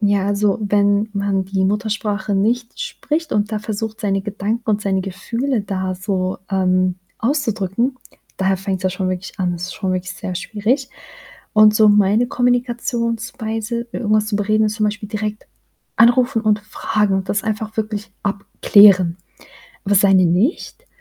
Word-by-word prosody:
Ja, 200 Hz, -2 st, +2 dB
also, 205 Hz, 0 st, +1 dB
wenn 205 Hz, +1 st, +2 dB
man 200 Hz, -1 st, -1 dB
die 190 Hz, 0 st, -1 dB
Muttersprache 210 Hz, 0 st, -1 dB
nicht 230 Hz, -, -1 dB
spricht, 325 Hz, -9 st, -3 dB
und 210 Hz, +1 st, 0 dB
da 215 Hz, -, -1 dB
versucht, 220 Hz, +1 st, -5 dB
seine 195 Hz, -2 st, 0 dB
Gedanken 210 Hz, +3 st, -3 dB
und 210 Hz, 0 st, +1 dB
seine 195 Hz, -2 st, 0 dB
Gefühle 230 Hz, +6 st, -2 dB
da 190 Hz, -2 st, -3 dB
so, 185 Hz, -1 st, -2 dB
ähm, 185 Hz, -1 st, +2 dB, 0.2 s
auszudrücken, 235 Hz, -2 st, -1 dB, 0.4 s
da 190 Hz, 0 st, +1 dB
fängt's 190 Hz, 0 st, -4 dB
ja 185 Hz, -, +2 dB
schon 185 Hz, 0 st, -2 dB
wirklich 185 Hz, 0 st, -4 dB
an. 180 Hz, -1 st, 0 dB
Das 170 Hz, 0 st, -6 dB
ist 185 Hz, -, -7 dB
schon 190 Hz, -3 st, -2 dB
wirklich 185 Hz, 0 st, -3 dB
sehr 185 Hz, -, -5 dB
schwierig. 235 Hz, +8 st, -1 dB, 0.6 s
Und 215 Hz, -1 st, +6 dB
so 215 Hz, -1 st, +5 dB
meine 210 Hz, +3 st, +3 dB
Kommunikationsweise, 235 Hz, -2 st, -1 dB
i -, -, -5 dB
irgendwas 215 Hz, -1 st, +1 dB
zu 210 Hz, -, 0 dB
bereden, 215 Hz, +1 st, +2 dB
ist 210 Hz, +1 st, -3 dB
zum 215 Hz, -, 0 dB
Beispiel 210 Hz, 0 st, -2 dB
direkt 210 Hz, 0 st, -4 dB, 0.5 s
anrufen 240 Hz, 0 st, +4 dB
und 215 Hz, -1 st, +2 dB
fragen 210 Hz, -1 st, -1 dB
und 190 Hz, 0 st, -3 dB
das 210 Hz, -, 0 dB
einfach 220 Hz, 0 st, -4 dB
wirklich 210 Hz, -2 st, -3 dB
abklären. 200 Hz, -3 st, +4 dB, 0.7 s
Aber 200 Hz, -, +1 dB
seine 195 Hz, -2 st, +5 dB
nicht. 215 Hz, -, 0 dB
210 Hz, 155 wpm, -19 LUFS, 195-225 Hz, 0.7 s, Und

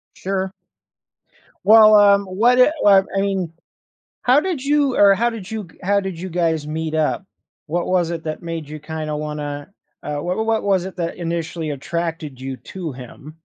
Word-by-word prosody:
Sure. 190 Hz, 0 st, -3 dB, 1.1 s
Well, 215 Hz, 0 st, +8 dB
um, 200 Hz, -1 st, +6 dB
what 230 Hz, +7 st, +2 dB
eh, 255 Hz, -, +6 dB
what 195 Hz, -1 st, +6 dB
I -, -, +2 dB
mean, 190 Hz, -4 st, -1 dB, 0.7 s
how 255 Hz, +3 st, +5 dB
did 330 Hz, -6 st, -3 dB
you 285 Hz, -2 st, +2 dB
or, 200 Hz, -1 st, +6 dB
how 235 Hz, +3 st, +1 dB
did 220 Hz, -4 st, -8 dB
you 215 Hz, -5 st, -5 dB
how 200 Hz, +2 st, +2 dB
did 190 Hz, -4 st, -5 dB
you 185 Hz, +2 st, -5 dB
guys 160 Hz, -3 st, 0 dB
meet 160 Hz, 0 st, -3 dB
up? 160 Hz, +5 st, 0 dB, 0.4 s
What 170 Hz, +2 st, -2 dB
was 175 Hz, -2 st, +1 dB
it 165 Hz, -1 st, -5 dB
that 155 Hz, 0 st, -4 dB
made 165 Hz, -3 st, -5 dB
you 155 Hz, 0 st, -7 dB
kinda 155 Hz, 0 st, -5 dB
wanna, 150 Hz, +1 st, -5 dB, 0.3 s
uh, 150 Hz, 0 st, -3 dB
wh -, -, -6 dB
wha 220 Hz, -, 0 dB
what 225 Hz, 0 st, 0 dB
was 190 Hz, -3 st, +1 dB
it 190 Hz, -, -7 dB
that 170 Hz, -1 st, -3 dB
initially 165 Hz, -2 st, -3 dB
attracted 160 Hz, -1 st, -4 dB
you 130 Hz, 0 st, -5 dB
to 175 Hz, 0 st, -7 dB
him? 135 Hz, +5 st, -11 dB
175 Hz, 185 wpm, -20 LUFS, 155-200 Hz, 1.1 s, Well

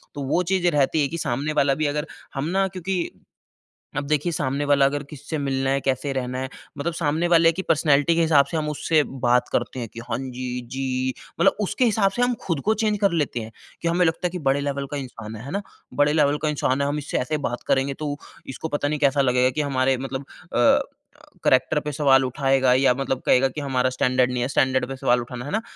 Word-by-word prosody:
तो 145 Hz, -, -5 dB
वो 170 Hz, +7 st, +1 dB
चीज़ें 180 Hz, 0 st, +1 dB
रहती 145 Hz, +2 st, +2 dB
हैं 140 Hz, -, +1 dB
कि 165 Hz, -, -4 dB
सामने 145 Hz, +2 st, -2 dB
वाला 140 Hz, -2 st, +3 dB
भी 155 Hz, +2 st, -1 dB
अगर 150 Hz, +1 st, -1 dB, 0.3 s
हम 135 Hz, +1 st, -2 dB
ना 195 Hz, +1 st, +2 dB
क्योंकि 185 Hz, -1 st, -3 dB, 0.9 s
अब 145 Hz, -, 0 dB
देखिए 150 Hz, +3 st, +1 dB
सामने 140 Hz, -1 st, -1 dB
वाला 140 Hz, -1 st, +4 dB
अगर 145 Hz, +1 st, 0 dB
किससे 150 Hz, +1 st, -6 dB
मिलना 135 Hz, -1 st, -1 dB
है, 135 Hz, 0 st, +2 dB
कैसे 135 Hz, +1 st, -1 dB
रहना 130 Hz, -1 st, -3 dB
है। 130 Hz, 0 st, -4 dB, 0.3 s
मतलब 165 Hz, +4 st, -2 dB
सामने 160 Hz, +1 st, 0 dB
वाले 165 Hz, -1 st, +5 dB
की 180 Hz, +3 st, -4 dB
पर्सनैलिटी 150 Hz, 0 st, +3 dB
के 170 Hz, -, +2 dB
हिसाब 150 Hz, -4 st, +5 dB
से 160 Hz, -, -4 dB
हम 150 Hz, -1 st, -1 dB
उससे 150 Hz, +1 st, +2 dB, 0.2 s
बात 125 Hz, 0 st, +3 dB
करते 130 Hz, -, -1 dB
हैं 115 Hz, -, -4 dB
कि 115 Hz, -, -8 dB
हाँ 115 Hz, -, 0 dB
जी, 125 Hz, -1 st, -5 dB
जी। 130 Hz, +1 st, -2 dB, 0.3 s
मतलब 170 Hz, -, +4 dB
उसके 245 Hz, +5 st, +1 dB
हिसाब 210 Hz, -3 st, +2 dB
से 245 Hz, -, -2 dB
हम 245 Hz, 0 st, +3 dB
खुद 165 Hz, -6 st, -1 dB
को 220 Hz, -, +4 dB
चेंज 210 Hz, -1 st, +1 dB
कर 200 Hz, -2 st, +4 dB
लेते 150 Hz, -7 st, -1 dB
हैं। 110 Hz, -, -8 dB, 0.3 s
कि 170 Hz, -, -1 dB
हमें 175 Hz, +1 st, +3 dB
लगता 165 Hz, +3 st, 0 dB
है 175 Hz, -, -7 dB
कि 180 Hz, -, -5 dB
बड़े 140 Hz, +1 st, +2 dB
लेवल 140 Hz, -1 st, -2 dB
का 145 Hz, -, -2 dB
इंसान 115 Hz, -5 st, -7 dB
है, 115 Hz, +4 st, -9 dB
है 140 Hz, -, -7 dB
ना? 200 Hz, +3 st, -1 dB, 0.3 s
बड़े 145 Hz, +1 st, +3 dB
लेवल 150 Hz, -1 st, +3 dB
का 155 Hz, -, +2 dB
इंसान 140 Hz, -2 st, 0 dB
है, 140 Hz, -, +1 dB
हम 145 Hz, +1 st, -1 dB
इससे 145 Hz, -, -3 dB
ऐसे 150 Hz, +5 st, -1 dB
बात 120 Hz, -, -6 dB
करेंगे 135 Hz, +1 st, +1 dB
तो 145 Hz, 0 st, -4 dB, 0.3 s
इसको 135 Hz, +4 st, -5 dB
पता 145 Hz, -1 st, -1 dB
नहीं 150 Hz, 0 st, -1 dB
कैसा 140 Hz, -1 st, +3 dB
लगेगा 125 Hz, -1 st, +3 dB
कि 150 Hz, +3 st, -2 dB
हमारे 135 Hz, -2 st, +1 dB
मतलब 135 Hz, +1 st, -5 dB, 0.3 s
अ, 120 Hz, 0 st, +5 dB, 0.7 s
कैरेक्टर 130 Hz, +3 st, +3 dB
पे 150 Hz, -, -4 dB
सवाल 135 Hz, -2 st, +4 dB
उठाएगा 130 Hz, 0 st, +2 dB
या 130 Hz, -1 st, +4 dB
मतलब 135 Hz, -1 st, -2 dB
कहेगा 135 Hz, +1 st, +4 dB
कि 150 Hz, +3 st, -6 dB
हमारा 130 Hz, -2 st, +1 dB
स्टैंडर्ड 130 Hz, 0 st, +2 dB
नहीं 125 Hz, -1 st, -2 dB
है, 125 Hz, -, 0 dB
स्टैंडर्ड 130 Hz, -1 st, +2 dB
पे 135 Hz, -, -4 dB
सवाल 125 Hz, -1 st, +2 dB
उठाना 125 Hz, +1 st, -7 dB
है -, -, -6 dB
ना? 220 Hz, +2 st, 0 dB
140 Hz, 240 wpm, -23 LUFS, 130-155 Hz, 0.9 s, वाले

